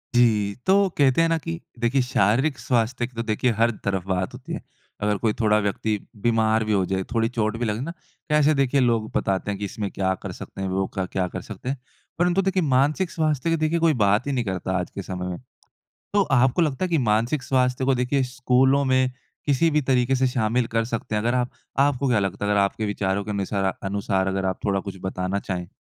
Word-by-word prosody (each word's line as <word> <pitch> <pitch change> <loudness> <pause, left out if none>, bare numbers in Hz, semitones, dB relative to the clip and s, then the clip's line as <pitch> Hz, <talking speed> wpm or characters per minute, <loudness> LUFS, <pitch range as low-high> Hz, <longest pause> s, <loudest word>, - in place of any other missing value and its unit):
जी। 105 -4 +3
तो 195 +1 +4
कहते 140 +2 +4
हैं 165 - +3
ना 165 - +2
कि 85 - -5 0.2
देखिए, 120 +3 +2
शारीरिक 125 +3 +2
स्वास्थ्य 120 0 0
की 125 - -21
तो 115 - -2
देखिए, 115 +3 +1
हर 115 +2 +2
तरफ 95 -2 -1
बात 95 -1 -1
होती - - -8
है। - - -4 0.4
अगर 105 0 +1
कोई 110 -2 +3
थोड़ा 105 -1 +4
व्यक्ति 105 +1 -1 0.2
बीमार 110 -1 +2
भी 110 - 0
हो 95 -2 +2
जाए, 95 0 -1
थोड़ी 115 -1 +2
चोट 110 -2 -1
भी 120 - -1
लगे 110 0 -1
ना, 155 +5 -4 0.4
कैसे 150 0 +4
देखिए 140 0 +2
लोग 115 -3 +1
बताते 95 +1 -1
हैं 100 - -3
कि 100 - -3
इसमें 100 +1 -4
क्या 95 -1 0
कर - - -4
सकते - - -8
हैं 95 - -1
वो 95 +1 0
क 95 - 0
क्या 95 -1 0
कर 95 +1 -6
सकते 110 +5 -7
हैं? 140 - -2 0.4
परंतु 175 +2 +3
देखिए 190 -1 +1
मानसिक 145 +6 +2
स्वास्थ्य 155 -2 0
की 165 - +3
देखिए 155 +2 +1
कोई 165 -1 +4
बात 105 0 +2
ही - - 0
नहीं 125 -3 -1
करता 95 -1 -2
आज 90 - -4
के 100 - -3
समय 90 -1 -5
में। 90 - -4 0.8
तो 205 - +5
आपको 130 +5 +4
लगता 150 +1 0
है - - -1
कि 165 -2 +2
मानसिक 120 +4 +1
स्वास्थ्य 130 -1 +1
को 135 0 +3
देखिए 125 +2 +1
स्कूलों 130 +2 +2
में 130 -1 +2 0.4
किसी 145 +3 +3
भी 150 0 +2
तरीके 130 -1 +2
से 130 +1 +2
शामिल 120 -1 +1
कर 115 0 0
सकते 115 -1 -4
हैं 105 - +1
अगर 120 +2 +1
आप 125 -1 0 0.3
आपको 140 -1 +2
क्या 120 -3 +3
लगता 100 0 -2
है - - 0
अगर 105 -1 +3
आपके 100 +2 0
विचारों 100 -1 -1
के 105 - -6
अनुसार 100 -1 -1
अनुसार 95 -1 0
अगर 95 0 -1
आप 95 0 -1
थोड़ा 100 -1 +1
कुछ 100 0 -7
बताना 95 0 -2
चाहें? 90 -3 -4
115 Hz, 230 wpm, -24 LUFS, 100-135 Hz, 0.8 s, तो